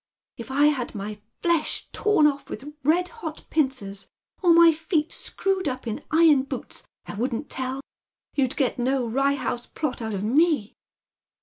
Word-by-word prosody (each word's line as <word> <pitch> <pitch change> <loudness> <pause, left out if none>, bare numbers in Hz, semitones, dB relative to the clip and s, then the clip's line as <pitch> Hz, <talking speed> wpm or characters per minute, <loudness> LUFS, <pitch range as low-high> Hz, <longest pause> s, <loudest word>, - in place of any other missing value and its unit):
" - - -70
If 235 +1 -8
I 280 +2 +3
had 265 -6 +1
my 210 +1 -5 0.2
flesh 340 -3 +1
torn 420 -8 +3
ofE 285 -1 +1
with 295 +2 -7
red 350 +5 +2
hot 325 -10 -8
pincers, 245 -10 -1 0.3
or 355 -3 +5
my 335 0 +8
feet 315 0 -1
screwed 385 -3 -1
up 255 -2 -3
in 220 -2 -4
iron 315 -3 +5
boots, 275 - -6 0.2
I - - -7
wouldn't 245 +5 -3
tell. 260 +1 -3 0.5
You'd 265 -3 +1
get 260 -3 0
no 255 +1 +1
Rye 275 +4 +2
House 245 -2 -3
Plot 290 -6 -3
out 220 -2 -3
ot 195 - -3
me." 280 -1 +2
275 Hz, 170 wpm, -25 LUFS, 245-315 Hz, 0.5 s, my